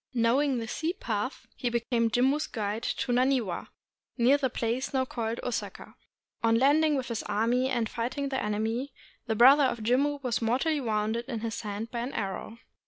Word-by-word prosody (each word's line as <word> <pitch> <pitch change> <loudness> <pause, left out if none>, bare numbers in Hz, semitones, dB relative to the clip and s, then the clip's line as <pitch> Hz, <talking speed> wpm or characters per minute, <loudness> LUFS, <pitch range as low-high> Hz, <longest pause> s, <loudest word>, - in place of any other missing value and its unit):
Knowing 255 +4 +2
the 225 -1 -4
sea 325 +8 -2
path, 225 - -3
he 245 - -1
became 235 0 0
Jimmu's 265 +6 +2
guide 210 0 -3
to 245 - -2
Naniwa, 245 -7 +1 0.5
near 250 +3 +5
the 280 -2 0
place 240 +4 -2
now 260 0 +2
called 230 -2 -3
Osaka. 245 -2 -4 0.5
On 230 0 +3
landing 295 +4 +4
with 260 -1 -3
his 230 -2 -2
army 235 +5 +1
and 240 -4 0
fighting 255 +6 -3
the 265 -1 -1
enemy, 225 +6 -2 0.3
the 220 - 0
brother 270 +5 +7
of 235 -4 -2
Jimmu 280 +5 +1
was 245 -2 -1
mortally 270 +7 +1
wounded 220 0 -1
in 230 -4 -4
the 225 -2 -3
hand 210 +1 -5
by 235 - -3
an 245 +4 -4
arrow. 195 +3 -4
240 Hz, 175 wpm, -28 LUFS, 225-265 Hz, 0.5 s, brother